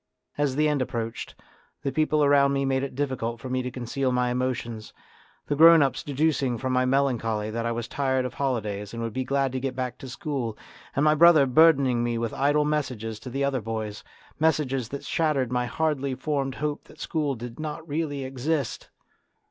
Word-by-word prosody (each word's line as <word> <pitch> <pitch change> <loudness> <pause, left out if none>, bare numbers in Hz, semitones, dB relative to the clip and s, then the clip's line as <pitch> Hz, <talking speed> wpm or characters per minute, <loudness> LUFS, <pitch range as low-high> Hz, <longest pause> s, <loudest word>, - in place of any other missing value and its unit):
As 145 -3 0
the 150 +1 +3
end 150 -2 +1
approached, 115 -2 -4 0.5
the 140 - -1
people 155 0 +2
around 140 -1 +4
me 140 0 0
made 135 0 +1
it 135 -2 -5
difficult 125 -4 -2
for 130 +1 -7
me 130 0 0
to 125 - -3
conceal 130 +2 -2
my 125 0 +1
emotions, 120 -3 -3 0.5
the 145 - -1
grown 165 0 +8
ups 135 - -1
deducing 140 -3 0
from 130 +2 -2
my 130 0 +3
melancholy 115 -5 0
that 115 +1 -2
I - - 0
was 115 -1 -3
tired 130 -1 0
of 125 - -4
holidays 105 -6 -2
and 115 - -4
would 115 -2 -4
be 130 - -1
glad 135 0 0
to 130 - -2
get 130 -1 -3
back 125 -1 -4
to 130 - -8
school, 130 -4 -4 0.4
and 140 - +2
my 150 - +6
brother 160 -2 +7
burdening 135 -3 +4
me 120 -1 -1
with 115 -1 -2
idle 145 +2 +2
messages 125 -8 -2
to 130 - -8
the 135 +3 -2
other 135 -3 0
boys 110 -1 -4 0.4
messages 135 -6 +1
that 140 +1 -6
shattered 145 -6 0
my 125 0 0
hardly 140 0 -1
formed 135 -2 -2
hope 150 +1 -3
that - - -17
school 150 -4 -1
did 120 +2 -8
not 155 +1 -5
really 145 -2 -2
exist. 135 +2 -2
130 Hz, 195 wpm, -26 LUFS, 120-145 Hz, 0.5 s, grown